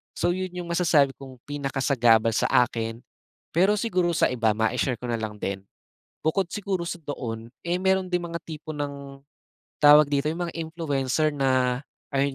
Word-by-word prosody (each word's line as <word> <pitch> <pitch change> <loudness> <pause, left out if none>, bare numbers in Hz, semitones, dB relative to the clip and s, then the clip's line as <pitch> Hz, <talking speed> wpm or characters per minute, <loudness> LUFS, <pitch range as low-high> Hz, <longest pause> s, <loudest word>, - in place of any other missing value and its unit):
So 175 - +1
'yon 185 -1 -3
'yong 175 -1 -5
masasabi 160 -5 +3
kong 130 -2 -11
pinakasagabal 135 -5 +2
sa - - +2
akin, 115 -2 +1 0.6
pero 190 +5 +4
siguro 185 -6 +1
sa - - +4
iba. 115 -3 +2
mai-share 120 +3 0
ko 125 - -4
na 120 - +1
lang 110 -1 -4
din, 95 0 -3 0.6
bukod 170 +4 +1
siguro 195 -4 -2
sa - - -3
doon, 115 -6 -5 0.2
eh, 175 - +1
meron 190 0 +2
din 180 0 0
mga 170 0 -4
tipo 155 -1 -7
ng, 140 -1 -6 0.7
tawag 150 0 +8
dito, 140 0 0
'yong 175 +2 -4
mga - - -8
influencer 155 -3 0
na, 130 -2 +1 0.3
ayun 140 0 +1
140 Hz, 165 wpm, -25 LUFS, 125-170 Hz, 0.7 s, tawag